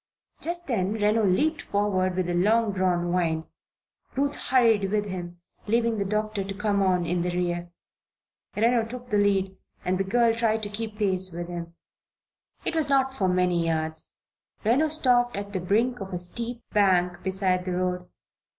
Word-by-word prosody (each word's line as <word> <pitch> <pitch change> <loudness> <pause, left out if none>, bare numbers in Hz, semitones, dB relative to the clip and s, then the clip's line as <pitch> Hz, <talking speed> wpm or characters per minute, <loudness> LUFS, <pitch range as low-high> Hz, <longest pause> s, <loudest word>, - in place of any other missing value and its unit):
Just 345 +1 0
then 205 -6 0
Reno 215 +1 +2
leaped 290 - +2
forward 190 -3 0
with 185 -1 0
a 175 - -1
long 215 +5 +3
drawn 180 -2 0
whine. 165 -3 0 0.7
Ruth 280 +2 0
hurried 225 -6 +3
with 210 0 0
him, 175 -3 -6 0.3
leaving 230 0 +1
the 200 - 0
doctor 215 0 -1
to 195 +1 -5
come 205 0 0
on 180 -2 +2
in 175 +1 0
the 180 - -1
rear. 175 -1 -2 0.9
Reno 230 +2 +3
took 245 +1 -8
the 205 - +3
lead 195 -2 +1 0.3
and 185 +1 0
the - - +2
girl 230 +4 +3
tried 225 -1 0
to 205 - -2
keep 215 +1 -5
pace 185 -3 +1
with 170 +1 -6
him. 170 -1 -6 0.9
It - - +1
was 315 -3 0
not 265 -1 +3
for 195 -8 0
many 180 -2 +2
yards. 160 -1 -1 0.5
Reno 260 +8 +3
stopped 250 -5 +2
at 200 0 -5
the 190 - -1
brink 225 +7 +1
of 190 -1 -6
a - - -1
steep 230 +7 -4
bank 180 -3 +2
beside 185 -1 0
the 180 - -2
road. 180 0 -2
200 Hz, 175 wpm, -26 LUFS, 180-230 Hz, 0.9 s, long